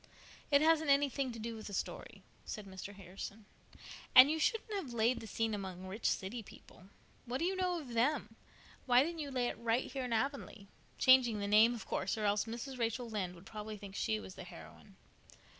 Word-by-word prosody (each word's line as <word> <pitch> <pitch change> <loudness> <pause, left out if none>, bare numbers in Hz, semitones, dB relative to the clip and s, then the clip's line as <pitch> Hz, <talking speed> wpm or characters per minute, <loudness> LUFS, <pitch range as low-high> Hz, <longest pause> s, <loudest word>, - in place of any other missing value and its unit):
"It 285 -1 +5
hasn't 315 -1 +4
anything 275 -2 +2
to 230 - -8
do 230 +1 -5
with 220 - -8
the 200 - -5
story," - - -5 0.2
said 210 -2 -6
Mr. 195 +1 -8
Harrison, 195 +3 -8 0.7
"and 260 +3 +10
you 320 - -1
shouldn't 440 +6 0
have 350 -12 -4
laid 235 +3 +2
the 225 - -9
scene 225 0 -1
among 190 -2 -5
rich 195 +4 -2
city 210 +5 -3
people. 185 -3 -16 0.4
What 245 +2 -1
do 330 - -1
you 380 +2 0
know 365 -2 0
of 285 -5 -9
them? 235 -2 +1 0.5
Why 245 +1 +6
didn't 335 +2 -4
you 290 -2 -3
lay 255 -2 0
it - - -5
right 235 +2 0
here 265 -1 -3
in 245 - -5
Avonlea—changing 245 -1 +1
the 200 0 -2
name, 220 +4 +6
of 230 - -8
course, 190 +3 -2
or 215 - -1
else 205 +1 +2
Mrs. 240 +3 -6
Rachel 235 +1 -1
Lynde 185 -4 -3
would 170 +2 -15
probably 215 0 -7
think 195 -1 -10
she 110 0 0
was 95 -2 -9
the - - -9
heroine." - - -13
230 Hz, 205 wpm, -34 LUFS, 205-270 Hz, 0.7 s, and